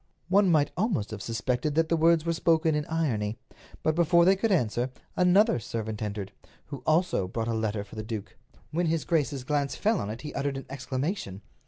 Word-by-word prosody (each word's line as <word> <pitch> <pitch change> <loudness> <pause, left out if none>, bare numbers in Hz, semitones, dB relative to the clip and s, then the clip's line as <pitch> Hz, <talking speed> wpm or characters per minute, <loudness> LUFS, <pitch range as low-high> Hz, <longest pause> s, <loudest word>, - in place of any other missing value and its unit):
One 195 0 +4
might 155 -4 +3
almost 180 - -1
have 105 -2 -6
suspected 125 +6 -1
that 165 0 +2
the 170 - +3
words 165 0 +4
were 170 - +1
spoken 165 -1 +2
in 150 0 -1
irony. 115 -10 -1 0.5
But 155 - +2
before 170 +1 +4
they 190 +2 +6
could 215 +3 0
answer, 125 - +1 0.3
another 185 - +4
servant 110 -1 -5
entered, 100 -2 -4 0.3
who 140 - -8
also 155 - +2
brought 110 +4 -3
a 115 - 0
letter 110 -2 -1
for 100 - -14
the 110 - -4
duke. 110 -1 -6 0.4
When 170 +2 0
his 160 0 0
grace's 145 -5 0
glance 140 +1 -1
fell 215 -2 +1
on 100 - -3
it 115 +3 -6
he 150 - -7
uttered 140 0 -2
an 135 - -7
exclamation. 135 - -3
145 Hz, 200 wpm, -28 LUFS, 110-170 Hz, 0.5 s, they